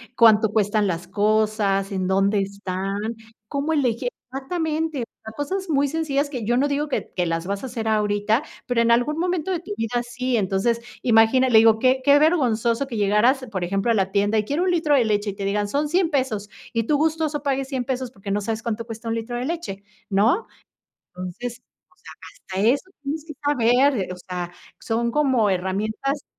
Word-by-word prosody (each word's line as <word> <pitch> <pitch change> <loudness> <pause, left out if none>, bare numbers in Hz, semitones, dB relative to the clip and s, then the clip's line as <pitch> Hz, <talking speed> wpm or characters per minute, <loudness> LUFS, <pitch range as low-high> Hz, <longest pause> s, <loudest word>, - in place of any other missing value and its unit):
cuánto 220 -2 +6
cuestan 210 0 +1
las 175 -2 -3
cosas, 210 -2 +1
en 190 -2 -1
dónde 195 +2 +2
están, 195 0 -4 0.5
cómo 280 +6 -2
elegir 250 -5 +1 0.2
exactamente, 315 0 -2 0.3
cosas 375 +6 -3
muy 285 -2 +2
sencillas, 290 -2 -1
que 250 -6 -5
yo 240 +3 +2
no 280 +3 +3
digo 290 +1 -1
que 285 - -3
que 180 - +1
las 165 0 -2
vas 200 0 -2
a - - -3
hacer 230 -3 -4
ahorita, 210 +3 +1 0.2
pero, 245 -2 0
en 235 0 +3
algún 245 +6 +2
momento 360 0 -1
de 355 - 0
tu 350 +5 -10
vida 240 +2 -1
sí. 245 0 -2
Entonces, 200 +4 +1 0.2
imagina, 240 +2 +4
le 225 - +6
digo: 220 0 +5
"Qué 260 +2 +3
qué 285 +1 +6
vergonzoso 255 -6 +2
que 245 - -6
llegaras, 210 +6 +3
por 190 -4 -2
ejemplo, 195 +5 0
a - - +4
la 195 -3 +1
tienda, 205 +2 +2
y 210 - +1
quiero 290 +9 0
un 370 - +2
litro 315 -4 +2
de 260 - +4
leche", 205 -1 0
y - - -10
te 200 - -6
digan: 205 +1 0
"Son 290 +7 -1
$100 350 +1 +2
pesos", 255 -8 -1 0.2
y 230 -1 +1
tú 295 +7 +1
gustoso 310 -1 0
pagues 270 -2 -1
$100 265 -2 -2
pesos, 255 0 -3
porque, 200 -2 -7
no 205 - +1
sabes 220 +2 -3
cuánto 230 0 -3
cuesta 225 0 -8
un 225 - 0
litro 230 +2 -4
de 245 - -3
leche, 320 - -4 0.3
¿no? 220 - +2 0.6
Entonces, 185 +7 -7
o - - -49 0.7
sea, - - -22 0.3
hasta 215 - +4
eso 280 +9 +1
tienes 295 +2 -4
que 315 - -8
saber, 265 -1 +3
eh, 190 - -2
o - - -8
sea, 175 -1 -4 0.3
son 235 +1 -1
como 260 -5 +2
herramientas 215 +9 -1
235 Hz, 200 wpm, -23 LUFS, 205-280 Hz, 0.7 s, cuánto